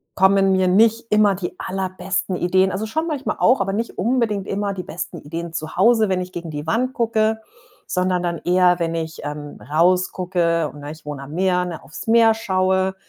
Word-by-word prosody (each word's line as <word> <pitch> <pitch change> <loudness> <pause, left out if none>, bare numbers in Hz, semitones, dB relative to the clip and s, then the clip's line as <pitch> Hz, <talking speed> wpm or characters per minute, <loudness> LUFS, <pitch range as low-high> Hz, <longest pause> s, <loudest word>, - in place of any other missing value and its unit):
kommen 195 0 +4
mir 185 -1 +2
nicht 225 +4 +3
immer 210 -2 +4
die 180 -1 -5
allerbesten 185 -1 -3
Ideen 185 +2 +2
also 195 +4 -3
schon 315 +10 -2
manchmal 290 -4 -2
auch, 250 0 +4
aber 195 0 -1
nicht 230 +3 -3
unbedingt 220 -2 0
immer 200 0 -2
die 180 -2 -5
besten 170 - -6
Ideen 165 +3 -6
zu 155 -1 -6
Hause, 220 +3 +4
wenn 185 -1 0
ich 180 0 -7
gegen 170 -2 -6
die 150 0 -5
Wand 250 +8 0
gucke, 220 -2 +1 0.5
sondern 180 -1 0
dann 170 -1 -1
eher, 180 0 +4
wenn 165 -1 -1
ich, 160 -1 -4
ähm, 145 0 -7
rausgucke 175 0 +1
und- 145 - -12
na, 145 +1 -7
ich 155 -1 -13
wohne 145 -2 -6
am 145 +3 -10
Meer, 180 0 +1
ne- 170 -3 -7
auf's 160 +10 -10
Meer 225 0 +5
schaue. 190 -2 0
185 Hz, 195 wpm, -21 LUFS, 170-210 Hz, 0.5 s, Meer